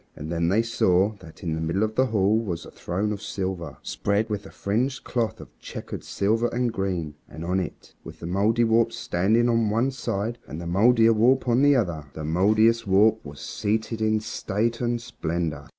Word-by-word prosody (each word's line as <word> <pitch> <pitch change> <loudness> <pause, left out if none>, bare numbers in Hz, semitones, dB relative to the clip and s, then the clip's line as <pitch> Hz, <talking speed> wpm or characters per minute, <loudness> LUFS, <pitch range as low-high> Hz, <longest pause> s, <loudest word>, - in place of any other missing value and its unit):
And 80 +2 -7
then 85 0 +1
they 110 +5 +3
saw 100 -4 +2
that 80 -3 -14
in 80 -3 -1
the 80 - -3
middle 85 +6 0
of 110 0 -1
the 130 +2 +2
hall 105 -2 +2
was 90 -7 -4
a - - -11
throne 100 +4 -2
of 100 - -7
silver, 95 -6 -4
spread 100 - -1
with 105 -1 -3
a - - -12
fringed 125 +7 -1
cloth 115 -3 -2
of - - -13
checkered - - -7
silver 110 +4 +1
and 120 -1 -1
green, 90 -7 -2 0.2
and 80 +2 -7
on 90 +2 +1
it, 90 - -7
with - - -11
the - - -7
Mouldiwarp 115 +5 +2
standing 110 +5 +1
on 115 -2 +2
one 115 +6 +1
side 115 -2 -3
and 80 - -6
the 85 - -6
Mouldierwarp 115 +6 +4
on 120 +2 +3
the 145 0 +5
other, 85 - -1
the 80 - -6
Mouldiestwarp 105 +4 +3
was 70 -1 -10
seated 110 +1 -2
in 110 0 +2
state 110 +3 -2
and 120 0 0
splendor. 85 -10 -4
105 Hz, 190 wpm, -25 LUFS, 90-115 Hz, 0.2 s, the